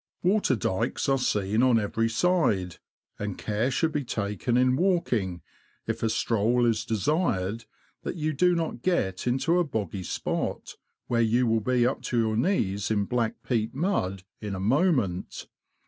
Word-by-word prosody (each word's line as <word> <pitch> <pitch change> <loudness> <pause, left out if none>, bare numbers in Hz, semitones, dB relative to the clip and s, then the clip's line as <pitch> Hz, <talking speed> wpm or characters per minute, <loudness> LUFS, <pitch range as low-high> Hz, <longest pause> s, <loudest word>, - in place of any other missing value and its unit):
Water 185 -7 +3
dykes 105 +2 -1
are 135 0 +3
seen 105 -2 +1
on 125 -3 +4
every 115 +2 0
side, 115 - +1 0.4
and 105 -2 -4
care 110 +4 -1
should 160 +5 +1
be 150 -1 -1
taken 105 +1 -1
in 125 0 +3
walking, 120 - 0 0.4
if - - -3
a 115 - +1
stroll 115 +2 +1
is 115 -1 +1
desired, 115 - 0 0.4
that - - -4
you 155 -2 -1
do 180 +5 +3
not 165 -7 -3
get 100 - 0
into 135 +8 +2
a - - +3
boggy 105 - -3
spot, 90 - -3 0.3
where 115 -1 +1
you 115 +2 +3
will 115 -1 +2
be 125 +1 +2
up 130 - 0
to 120 - -2
your 110 -1 +1
knees 105 - 0
in 105 -2 +1
black 115 0 -2
peat 115 -2 0
mud 100 - -1 0.2
in 105 -2 -4
a - - -5
moment. 115 - 0
115 Hz, 165 wpm, -27 LUFS, 105-135 Hz, 0.4 s, on